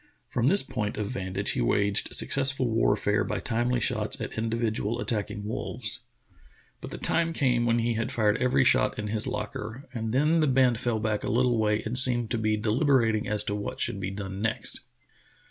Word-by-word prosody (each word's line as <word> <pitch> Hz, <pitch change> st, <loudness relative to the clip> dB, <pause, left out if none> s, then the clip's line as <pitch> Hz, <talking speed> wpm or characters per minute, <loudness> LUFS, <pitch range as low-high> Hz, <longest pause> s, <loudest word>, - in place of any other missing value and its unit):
From 120 Hz, +1 st, 0 dB
this 195 Hz, +7 st, +6 dB
point 105 Hz, -6 st, -4 dB
of 105 Hz, +1 st, -3 dB
vantage 95 Hz, -3 st, -2 dB
he -, -, -1 dB
waged 100 Hz, +11 st, +1 dB
successful 135 Hz, -2 st, +4 dB
warfare 105 Hz, -2 st, +1 dB
by -, -, -3 dB
timely 120 Hz, +1 st, 0 dB
shots -, -, -1 dB
at -, -, -5 dB
individ 115 Hz, 0 st, -2 dB
ual 115 Hz, +4 st, -2 dB
attacking 105 Hz, -4 st, -3 dB
wolves. 110 Hz, 0 st, -4 dB, 0.8 s
But -, -, -7 dB
the -, -, -7 dB
time 165 Hz, 0 st, +1 dB
came 125 Hz, -6 st, +1 dB
when 115 Hz, 0 st, +2 dB
he 120 Hz, 0 st, 0 dB
had 110 Hz, 0 st, -3 dB
fired 110 Hz, -1 st, +1 dB
every 130 Hz, +2 st, +3 dB
shot -, -, +2 dB
in 105 Hz, 0 st, -4 dB
his 110 Hz, 0 st, -2 dB
locker, 110 Hz, +5 st, -6 dB
and 115 Hz, -3 st, -3 dB
then 150 Hz, +6 st, +2 dB
the 155 Hz, -, +2 dB
band 130 Hz, -3 st, +3 dB
fell 120 Hz, -3 st, -1 dB
back 110 Hz, -1 st, -2 dB
a -, -, -2 dB
little 120 Hz, 0 st, +2 dB
way 105 Hz, 0 st, +1 dB
and 120 Hz, +3 st, 0 dB
seemed 120 Hz, -3 st, +3 dB
to 115 Hz, -, -1 dB
be 110 Hz, -1 st, 0 dB
deliberating 115 Hz, 0 st, +1 dB
as 105 Hz, 0 st, 0 dB
to 100 Hz, -, -3 dB
what 105 Hz, 0 st, -5 dB
should 100 Hz, -, -1 dB
be 95 Hz, 0 st, -3 dB
done 95 Hz, 0 st, -6 dB
next. 110 Hz, 0 st, -3 dB
115 Hz, 195 wpm, -27 LUFS, 105-125 Hz, 0.8 s, this